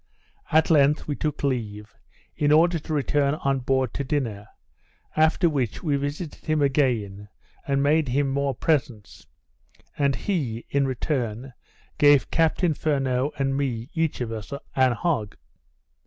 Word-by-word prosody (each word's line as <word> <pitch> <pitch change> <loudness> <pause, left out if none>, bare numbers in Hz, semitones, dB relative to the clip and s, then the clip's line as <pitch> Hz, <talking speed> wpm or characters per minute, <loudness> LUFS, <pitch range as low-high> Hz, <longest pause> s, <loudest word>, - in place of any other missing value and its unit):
At 160 +2 +3
length 145 -1 +3
we 145 - -2
took 150 -1 -3
leave, 110 -6 -3 0.4
in 145 0 +1
order 165 +2 +4
to 155 - -9
return 145 0 +1
on 135 -2 -1
board 130 -1 0
to 140 - -3
dinner, 120 -8 -3 0.7
after 160 +3 +3
which, 135 - -2
we 150 -4 +1
visited 145 +3 -4
him 155 0 0
again, 120 -8 0 0.4
and 140 0 +1
made 150 +1 +2
him 140 +3 +1
more 135 0 -1
presents, 130 -8 -2 0.7
and 140 -2 +1
he, 135 - -3
in 140 -1 +2
return, 125 -2 -3 0.5
gave 145 -2 +5
Captain 165 +1 +2
Furneaux 135 -2 0
and 135 -1 0
me 130 -2 -3
each 160 -5 -1
of 115 -2 -3
us 110 -2 -7 0.2
an 130 -2 +4
hog. 120 - -2
140 Hz, 140 wpm, -24 LUFS, 125-150 Hz, 0.7 s, gave